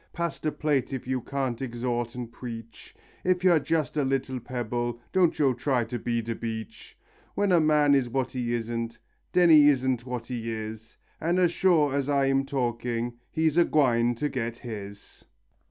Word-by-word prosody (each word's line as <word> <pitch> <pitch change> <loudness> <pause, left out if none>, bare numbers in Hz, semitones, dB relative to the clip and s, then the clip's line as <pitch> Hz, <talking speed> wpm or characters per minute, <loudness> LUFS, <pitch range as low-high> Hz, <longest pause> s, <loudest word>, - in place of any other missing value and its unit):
Pass 170 -1 -3
de 155 - -1
plate 145 -3 0
if 130 -2 -4
yo 130 0 -1
can't 135 -2 -3
exhawt 120 -1 -2
and 120 -2 -6
preach; 115 -2 -9 0.3
If 180 0 +1
yo're 175 -4 +5
jess 155 -1 -1
a 150 - +1
little 130 -1 -1
pebble, 120 0 -3
don't 180 -3 +3
yo 135 -3 +3
try 125 0 0
to 120 +2 -5
be 115 0 -1
de 115 +1 -3
beach; 110 -2 -7 0.4
When 205 -1 +1
a 175 - +6
man 150 -2 +4
is 135 -3 +2
what 130 0 -1
he 120 -2 -2
isn't, 115 0 -3 0.3
den 175 -2 +5
he 150 -2 +8
isn't 130 -3 +1
what 125 -2 -4
he 115 -2 -4
is, 110 0 -7 0.2
An' 170 +3 0
as 180 -2 +3
sure 165 -6 +3
as 140 0 -1
I'm 135 -1 +2
talking, 120 -2 -2
he's 160 +1 +1
a - - +7
gwine 120 -7 +2
to 150 +6 -1
get 120 -4 -3
his. 100 -3 -8
130 Hz, 180 wpm, -27 LUFS, 120-145 Hz, 0.4 s, he